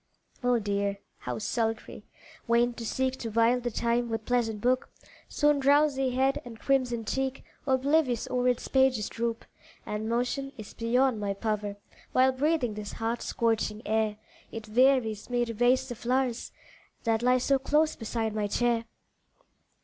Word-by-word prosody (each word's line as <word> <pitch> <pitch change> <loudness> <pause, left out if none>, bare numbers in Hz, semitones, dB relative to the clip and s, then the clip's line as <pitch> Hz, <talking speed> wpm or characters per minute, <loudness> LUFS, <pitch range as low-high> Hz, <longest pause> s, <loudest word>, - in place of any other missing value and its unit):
Oh 245 -1 +3
dear! 200 -2 -1 0.2
how - - -4
sultry! 225 +1 -3 0.4
vain 240 +1 +3
to 235 - -7
seek 260 +2 -1
To 230 - -4
while 230 +3 +3
the 245 0 -2
time 235 +1 0
with 225 -1 -3
pleasant 235 -3 0
book, 255 +4 +1 0.4
Soon 295 -1 +2
drowsy 280 -1 +3
head 265 +2 +1
and 230 -2 -10
crimsoned 250 -5 0
cheek 270 0 -2 0.2
Oblivious 265 -1 +2
o'er 250 0 +1
its 250 -1 0
pages 265 -5 +2
droop 230 0 -3 0.4
And 210 +1 -3
motion 250 +4 -1
is 215 -2 -9
beyond 245 +1 +1
my 200 -1 -2
power, 210 -1 -2 0.4
While 260 +1 +5
breathing 270 -3 0
this 210 -1 -6
hot, 230 +1 -2
scorching 225 -1 -1
air, 215 -1 0 0.3
It 225 -1 -7
wearies 240 -3 +2
me 245 -1 +1
to 230 - -5
raise 245 +3 +3
the 245 - -4
flowers, 245 +1 -1 0.5
That 225 -1 +1
lie 250 +1 +4
so 270 +2 +2
close 300 +3 +2
beside 225 -1 -3
my 210 -1 -1
chair. 235 +2 +1
240 Hz, 155 wpm, -28 LUFS, 225-260 Hz, 0.5 s, While